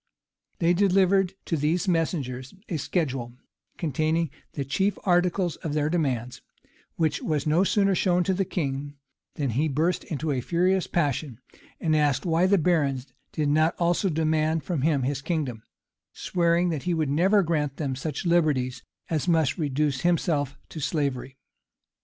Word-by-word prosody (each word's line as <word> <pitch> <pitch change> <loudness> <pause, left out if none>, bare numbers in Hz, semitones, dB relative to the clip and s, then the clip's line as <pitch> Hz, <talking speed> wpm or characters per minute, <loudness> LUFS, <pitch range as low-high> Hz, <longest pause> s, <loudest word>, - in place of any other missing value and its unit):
They 170 0 +3
delivered 195 0 +3
to 165 - -1
these 160 +6 0
messengers 145 -6 -1
a 170 - -2
schedule, 135 -6 -2 0.4
containing 160 0 0 0.2
the 140 - -3
chief 190 +10 0
articles 175 -1 +1
of 150 -2 -4
their 150 0 +1
demands; 130 -8 -1 0.5
which 155 -3 0
was 150 -3 -1
no 155 +4 +3
sooner 195 0 +2
shown 180 -1 +2
to 190 - +1
the 195 +1 +1
king, 145 -5 -3 0.4
than 140 -4 -1
he 145 +8 +1
burst 155 +5 0
into 155 0 -3
a 130 -3 -1
furious 180 +6 +1
passion, 145 -6 -1 0.4
and 155 -2 +1
asked 145 -2 +1
why 170 +2 +3
the 200 +1 +4
barons 140 -7 0 0.2
did 150 -2 -1
not 155 +3 +3
also 175 +3 +1
demand 155 0 0
of 160 -6 0
him 145 -2 +2
his 140 +1 -1
kingdom; 145 -8 -2 0.5
swearing 170 0 +1
that 155 -4 -2
he 175 - +2
would 155 -3 0
never 190 +7 +4
grant 150 -5 -1
them 140 -4 -2
such 145 +5 -4
liberties 150 -7 +1 0.3
as 160 0 -1
must 160 -3 +2
reduce 145 -2 0
himself 160 -5 0
to 160 - -7
slavery. 140 -3 -2
155 Hz, 155 wpm, -26 LUFS, 140-175 Hz, 0.5 s, the